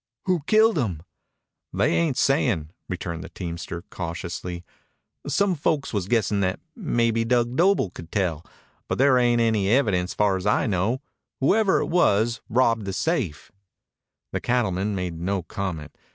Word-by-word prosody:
"Who 180 -4 +1
killed 220 -4 +4
him?" 90 - -2 0.7
"They - - +1
ain't 160 -6 +1
sayin'," 115 - +1 0.2
returned 85 -2 -4
the - - -9
teamster 85 -1 -6
cautiously. 85 0 -5 0.6
"Some 200 -2 +2
folks 150 -3 -1
was 100 -3 -1
guessin' 110 -2 +1
that 95 -1 0 0.2
mebbe 115 -1 0
Dug 120 0 +1
Doble 175 - +3
could 85 -2 -11
tell, 85 -6 -1 0.4
but - - -2
there 130 -1 +5
ain't 120 -1 +3
any 110 -4 +2
evidence 100 -7 +2
far's 100 -2 +1
I 105 - +2
know. 110 +7 0 0.4
Whoever 200 +8 +3
it - - 0
was 115 - +2
robbed 115 -3 +2
the 95 - -3
safe." 100 - -2 0.8
The - - -1
old - - -5
cattleman 105 -4 0
made 90 -3 -4
no 95 +1 -1
comment. 85 -5 -5
105 Hz, 150 wpm, -24 LUFS, 90-125 Hz, 0.8 s, there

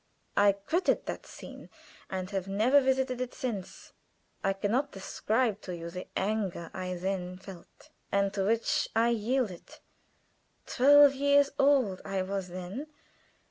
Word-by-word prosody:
I 205 -1 +5
quitted 315 - 0
that - - -6
scene - - -11 0.4
and 185 0 -4
have 195 -2 -3
never 225 +9 +4
visited 260 -1 0
it 255 - -4
since. 225 -9 -6 0.5
I 195 - +2
can 200 +1 -2
not 275 +4 0
describe 215 +3 -1
to 180 - -6
you 170 0 -7
the 180 +1 -7
anger 195 -4 -2
I 185 -1 -4
then 180 0 -3
felt, 190 -2 -14 0.2
and 200 0 +1
to 195 -1 -1
which 225 +2 +1
I 230 +1 +4
yielded. 230 -4 -2 0.9
Twelve 285 +2 +6
years 285 +1 +3
old 270 -9 +3
I 195 -1 -2
was 195 0 -3
then. 185 - -6
205 Hz, 140 wpm, -29 LUFS, 190-255 Hz, 0.9 s, Twelve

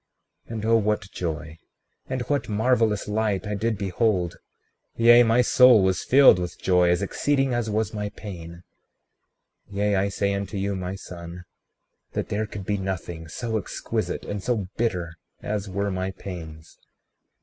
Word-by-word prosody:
36:20 - - -12
And 110 -1 -4
oh, 115 +1 +4
what 105 -3 -1
joy, 80 -2 -4 0.5
and 130 -1 -2
what 145 -1 -1
marvelous 110 -1 +1
light 105 -1 0
I 105 - -3
did 110 +1 -1
behold; 95 -2 0 0.6
yea, 120 +1 +7
my 120 +1 +4
soul 125 -4 +6
was 95 -1 +1
filled 135 -8 +7
with 90 -1 -4
joy 90 -1 +3
as 90 +2 +2
exceeding 135 +5 0
as 120 -2 -1
was 110 +1 -1
my 105 -1 -3
pain! 85 -5 -9 1.1
36:21 100 - -9
Yea, 105 0 +2
I 100 +1 +1
say 100 0 0
unto 100 0 -4
you, 100 +1 -1
my 95 0 -4
son, 85 -1 -9 0.7
that - - -3
there 105 +1 -1
could 100 -2 -7
be 105 +1 0
nothing 85 -3 -5
so 110 +6 -2
exquisite 95 - -4
and 100 -1 -4
so 110 -4 -1
bitter 90 -8 -2 0.3
as 105 -1 -3
were 100 +1 -1
my 95 0 -2
pains. 85 -5 -9
100 Hz, 160 wpm, -25 LUFS, 90-110 Hz, 1.1 s, yea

